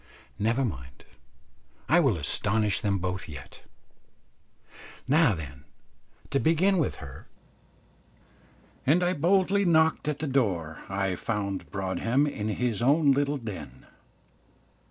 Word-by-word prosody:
Never 115 +5 +1
mind, 65 - -7 0.8
I - - +5
will - - +2
astonish 105 -1 0
them 100 -1 +1
both 90 -1 -4
yet. 70 -4 -10 1.5
Now 145 - +4
then, 70 -4 -9 0.7
to 140 - +2
begin 175 +5 +3
with 155 - 0
her; 70 -1 -11 1.6
and 165 +7 +3
I 175 +1 +2
boldly 190 +4 +2
knocked 160 -4 +3
at 150 -2 -1
the 155 - -4
door. 95 - -1
I 95 -1 -1
found 100 -1 -3
Broadhem 105 +8 0
in 110 -8 -3
his 115 0 -1
own 145 +3 +4
little 145 +1 +1
den. 110 -7 -8
115 Hz, 115 wpm, -27 LUFS, 95-150 Hz, 1.6 s, I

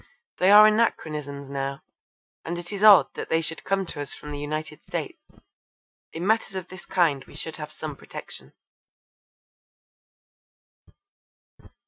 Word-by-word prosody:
They 185 - +4
are 210 +1 +10
anachronisms 150 -10 0
now, 135 0 -4 0.6
and 170 +2 -4
it 175 +3 -7
is 200 - -5
odd 205 -4 +8
that - - -6
they 160 - +3
should 160 -2 -4
come 195 -1 0
to 145 - -6
us 145 - -5
from 150 - -9
the 145 - -5
United 150 +1 -5
States. - - -4 0.9
In 165 +2 -5
matters 220 -1 +1
of 185 -2 -5
this 185 -1 -12
kind 165 -8 +2
we - - -16
should 160 - -6
have 150 -1 -7
some - - -6
protection. - - -10
165 Hz, 140 wpm, -25 LUFS, 145-195 Hz, 0.9 s, are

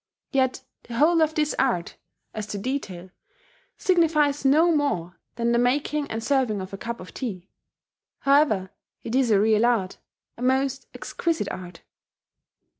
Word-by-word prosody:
Yet 260 -2 +1 0.2
the 235 - -7
whole 325 +6 +4
of 315 0 +2
this 300 -1 +1
art, 205 -10 0 0.4
as 215 -1 -5
to 210 - -4
detail, 195 -6 -4 0.7
signifies 305 -6 +2
no 315 +5 +4
more 185 - -1 0.2
than 235 0 0
the 235 - +3
making 285 +4 0
and 225 0 -4
serving 255 -7 +1
of 185 +1 -7
a - - -4
cup 235 0 -5
of 180 -2 -11
tea. 195 -8 -6 0.7
However, 275 -10 +3 0.3
it 230 - -5
is 260 -2 +3
a 205 -3 +4
real 215 +1 +3
art 225 -6 +1 0.4
a - - -11
most 265 +1 0
exquisite 335 -1 -2
art. 175 -2 -9
250 Hz, 150 wpm, -25 LUFS, 210-285 Hz, 0.7 s, whole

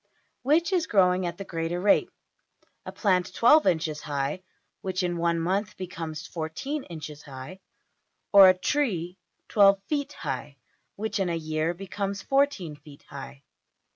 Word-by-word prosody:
Which 325 +7 +2
is 355 -3 +1
growing 185 -3 +3
at 170 0 -5
the 195 - -5
greater 165 0 -3
rate; 200 +2 +3 0.8
a - - -4
plant 185 -4 +1
$12$~inches 170 - +3
high 145 +4 -3 0.4
which 185 0 -2
in 175 -1 -1
one 170 0 +1
month 190 +5 -1
becomes 165 -4 -6
$14$~inches 160 - -5
high, 140 +7 -10 0.7
or 195 -2 +10
a 185 - +3
tree 185 - -1 0.3
$12$~feet 200 +8 +3
high 140 -1 -5 0.4
which 220 0 -3
in 190 -2 0
a 170 - -1
year 155 +1 -1
becomes 195 +1 -4
$14$~feet 170 - -1
high? 65 +2 -9
180 Hz, 130 wpm, -27 LUFS, 160-200 Hz, 0.8 s, or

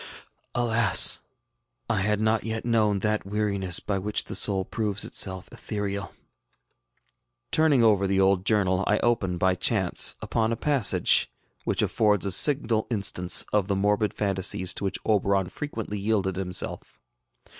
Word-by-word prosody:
Alas! 115 -5 +4 0.7
I 115 - 0
had 105 +1 0
not 110 0 +1
wet 110 0 -4
known 105 -4 +1
that 105 0 0
weariness 100 -3 -1
by 100 -2 -3
which 105 +2 -1
the - - -8
soul 95 -2 +1
proves 105 -2 -2
itself 95 -1 -2
ethereal. 100 -2 -4
ŌĆØ - - -16 1.4
Turning 155 -6 +3
over 100 -3 +3
the 95 0 +1
old 95 -1 +3
journal, 95 -3 +1
I 105 - +3
open, 100 -7 0
by 95 +1 +2
chance, 95 0 0
upon 115 0 -1
a - - 0
passage 140 -7 +1 0.4
which - - 0
affords 105 -2 +1
a 100 - -1
signal 115 -1 +2
instance 95 -5 0
of 105 -3 +1
the 100 - 0
morbid 105 +1 +1
fancies 95 -2 -1
to - - -4
which 95 - -2
Oberon 100 -3 +1
frequently 110 -8 -5
yielded 100 -3 -1
himself. 90 -2 -4
105 Hz, 145 wpm, -25 LUFS, 95-110 Hz, 1.4 s, Alas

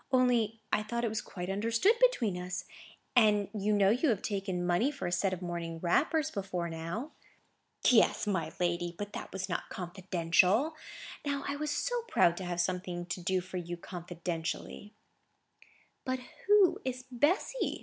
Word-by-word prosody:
Only 240 -4 +3
I - - +3
thought 235 +2 -3
it 230 - +1
was 215 0 -2
quite 180 -2 -6
understood 230 - +3
between 250 - +3
us. 180 +1 -4 0.5
And 210 -4 +5
you 210 0 0
know 200 -2 +4
you 255 +7 +2
have 215 -5 +1
taken 195 -4 -2
money 175 +10 +3
for 285 -2 -5
a - - -1
set 190 +2 +1
of 185 - -5
morning 170 -1 -4
wrappers, 295 - +2
before 185 -4 -3
now." 170 - -4 0.8
"Yes, 235 -4 +5
my 175 -6 -1
lady; 175 -1 0
but 205 0 -5
that - - -6
was 190 0 -3
not - - -3
confidential. 185 - +1 0.5
Now 280 -1 -1
I 280 - -1
was 300 +1 -2
so 390 +11 -1
proud 170 - +4
to 185 - -4
have 175 0 -3
something 180 -1 -1
to 175 +1 -4
do 185 +1 +1
for 185 +1 -7
you 175 0 -4
confidentially." 175 +3 -5 1.1
"But 260 -1 -1 0.3
who 410 -3 +6
is 255 -1 -3
Bessy?" 305 - +1
195 Hz, 165 wpm, -31 LUFS, 175-245 Hz, 1.1 s, who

